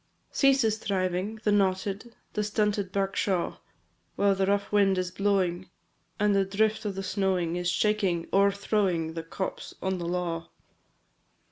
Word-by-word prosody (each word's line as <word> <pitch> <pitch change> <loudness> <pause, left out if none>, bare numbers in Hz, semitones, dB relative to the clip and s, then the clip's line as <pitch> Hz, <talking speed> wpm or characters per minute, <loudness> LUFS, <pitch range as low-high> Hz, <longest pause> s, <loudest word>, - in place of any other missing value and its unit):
III. - - -42
Ceases 265 -6 +3
thriving, 190 +1 -1
the 210 - +2
knotted, 200 +3 0 0.2
The 210 - 0
stunted 210 -2 0
birk 195 0 -1
shaw; 185 -4 0 0.6
While 200 0 +3
the 190 0 0
rough 200 0 0
wind 200 -2 +3
is 180 -1 -1
blowing, 185 -2 0 0.5
And 205 0 +3
the 195 - +4
drift 215 +3 0
of 200 -2 -2
the 195 - -4
snowing 185 -3 0
Is 175 0 -1
shaking, 195 -4 +1
o'erthrowing, 195 -4 +2
The 165 - -4
copse 175 +3 -5
on 190 -1 -2
the 170 - -4
law. 170 -2 -2
195 Hz, 150 wpm, -28 LUFS, 180-205 Hz, 0.6 s, the